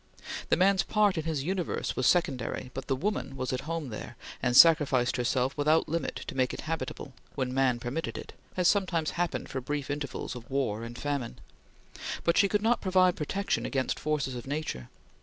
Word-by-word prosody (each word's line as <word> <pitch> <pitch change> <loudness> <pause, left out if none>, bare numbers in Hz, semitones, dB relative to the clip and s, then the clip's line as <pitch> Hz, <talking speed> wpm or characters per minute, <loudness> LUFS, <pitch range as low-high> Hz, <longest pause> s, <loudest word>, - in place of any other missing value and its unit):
The - - +4
man's 190 +1 +4
part 210 -3 +2
in 160 -2 -2
his 155 -4 -1
Universe 180 +1 -2
was 130 - +2
secondary, 130 -7 0
but 135 - -6
the 135 - +1
woman 140 -4 -2
was 130 0 -2
at 130 +4 -4
home 165 -5 -3
there, 105 - -7 0.2
and 125 0 +2
sacrificed 145 -7 +6
herself 125 +2 0
without 155 +2 +3
limit 165 +2 -2
to - - -6
make 130 -1 0
it - - -6
habitable, 155 -3 -4 0.2
when 130 -2 -2
man 130 -2 +2
permitted 130 +7 -3
it, - - -8 0.2
as 180 -1 +3
sometimes 180 -6 +2
happened 175 -1 -2
for 130 - -3
brief 145 +1 -3
intervals 145 -3 -4
of 120 -2 -10
war 125 -5 -1
and 120 +1 -7
famine; 140 -3 -3 0.9
but 170 - +3
she 200 - +4
could 210 +1 +1
not 235 +2 +2
provide 185 -2 +4
protection 195 +6 -1
against 130 -2 -1
forces 150 -3 -1
of 120 0 -7
nature. 140 - -4
145 Hz, 190 wpm, -29 LUFS, 130-170 Hz, 0.9 s, sacrificed